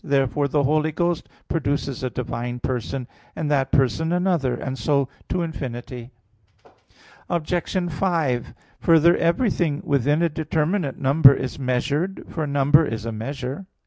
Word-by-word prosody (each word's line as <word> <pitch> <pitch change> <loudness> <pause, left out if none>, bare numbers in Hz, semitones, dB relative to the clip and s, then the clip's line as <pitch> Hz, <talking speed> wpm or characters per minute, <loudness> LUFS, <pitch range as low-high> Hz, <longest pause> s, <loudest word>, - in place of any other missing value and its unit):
Therefore 140 +1 +1
the 145 +1 +1
Holy 155 +3 +2
Ghost 175 +1 -1 0.2
produces 140 -4 -2
a 130 - -1
divine 120 0 -4
person; 125 +1 -3 0.3
and 150 -2 -2
that 135 -2 +1
person 140 +5 +2
another; 175 -8 +1
and 130 +2 -4
so 135 +3 +1 0.2
to 180 -1 0
infinity. 125 -6 -6 1.2
Obj. 170 0 -2 0.4
5: 150 -8 0 0.3
Further, 165 +1 +5
everything 170 - +1
within 145 +3 +2
a - - +4
determinate 155 +1 -1
number 140 0 +6
is 130 +1 -4
measured, 140 +8 -1
for 155 -3 -3
number 145 +2 +4
is 115 -6 -4
a 115 - -2
measure. 130 - -5
145 Hz, 135 wpm, -23 LUFS, 130-160 Hz, 1.2 s, number